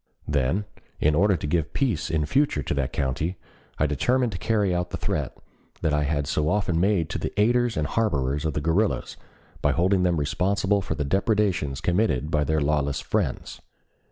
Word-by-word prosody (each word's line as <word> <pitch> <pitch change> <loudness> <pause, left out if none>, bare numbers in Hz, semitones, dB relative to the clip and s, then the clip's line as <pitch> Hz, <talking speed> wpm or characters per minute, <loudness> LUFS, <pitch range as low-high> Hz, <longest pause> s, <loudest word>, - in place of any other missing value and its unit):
Then 75 +8 0 0.3
in 75 - +3
order 95 +5 +3
to 75 - -5
give 75 -1 -1
peace 115 - 0
in 80 -2 0
future 105 - +1
to - - -2
the 70 -2 0
county, 75 +6 -2 0.4
I 75 - +2
determined 120 - +1
to 90 - -5
carry 105 -5 +1
out 90 0 -1
the - - -4
threat - - -3 0.5
I 75 -1 +2
had 75 0 0
so 75 +2 0
often 95 -4 +1
made 95 -3 +2
to - - -2
the - - -4
aiders 120 +1 +2
and 75 - +1
harborers 70 -8 0
of 80 -2 -2
the 75 - -1
guerrillas 90 +7 0 0.5
by - - +2
holding 90 +3 +2
them 90 -2 +2
responsible 95 +6 +1
for - - -3
the 75 - -2
depredations 95 - 0
committed 85 - +1
by 75 -1 +2
their 80 0 +1
lawless 70 -1 0
friends. - - -2
80 Hz, 185 wpm, -25 LUFS, 75-100 Hz, 0.5 s, in